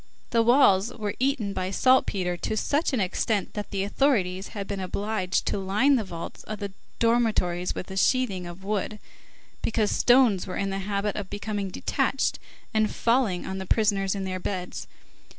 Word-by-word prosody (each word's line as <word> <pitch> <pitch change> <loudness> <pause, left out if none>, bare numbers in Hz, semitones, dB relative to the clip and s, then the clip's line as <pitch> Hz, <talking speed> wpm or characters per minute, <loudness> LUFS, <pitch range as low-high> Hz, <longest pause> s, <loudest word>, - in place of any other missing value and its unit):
The 230 - +4
walls 230 -4 +5
were 210 -2 -4
eaten 255 -6 0
by 185 -1 -2
saltpetre 195 -5 +2
to 215 +5 -3
such 295 +9 +1
an 260 - 0
extent 200 +2 0
that 210 -1 -5
the 195 -1 -1
authorities 195 -5 +1
had 200 - -3
been 200 -1 -3
obliged 190 0 -1
to - - -1
line 210 +9 +3
the 235 - +1
vaults 170 -4 -7
of 215 - -5
the 200 -1 -5 0.2
dormitories 220 -7 +1
with 185 - -6
a 190 - -5
sheathing 195 -6 +1
of 175 +2 -10
wood, 210 +1 -2 0.6
because 220 -2 +1
stones 240 -7 +4
were 185 - -4
in 195 0 -1
the 195 - -2
habit 200 +1 -2
of 200 -3 -4
becoming 205 -1 -3
detached 270 +7 0 0.3
and 215 -1 +2
falling 230 -6 +1
on 190 0 -4
the 190 - -6
prisoners 200 -3 +2
in 195 - -3
their 185 -1 -3
beds. 180 -1 -4
200 Hz, 175 wpm, -26 LUFS, 190-225 Hz, 0.6 s, walls